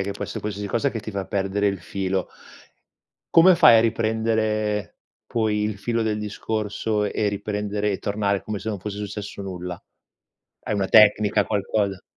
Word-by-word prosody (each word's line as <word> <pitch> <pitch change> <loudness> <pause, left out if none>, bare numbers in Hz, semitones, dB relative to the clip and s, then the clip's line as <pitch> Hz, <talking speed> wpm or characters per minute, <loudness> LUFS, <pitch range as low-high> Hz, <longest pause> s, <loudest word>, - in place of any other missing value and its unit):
che 100 +1 -2
può 100 - -5
esse - - -6
qualsiasi 105 -1 -4
cosa 125 +7 0
che 115 - -5
ti 105 +1 -7
fa 100 -2 -4
perdere 100 +1 -1
il 100 -2 -1
filo. 95 +1 -2 1.1
Come 180 +3 +8
fai 155 -10 +7
a - - +6
riprendere 110 -2 0 0.3
poi 110 -2 0
il 105 -1 -2
filo 115 +2 -1
del 110 -1 -1
discorso 105 0 -2
e 105 0 0
riprendere 105 0 -2
e 95 - -2
tornare 100 -1 -1
come 110 -1 -4
se 110 - -6
non 105 -2 -3
fosse 100 +2 -6
successo 105 0 -6
nulla? 90 -2 -6 0.8
Hai 105 - -2
una 100 -1 0
tecnica, 105 -1 +5
qualcosa? 100 -1 -1
105 Hz, 170 wpm, -23 LUFS, 100-110 Hz, 1.1 s, Come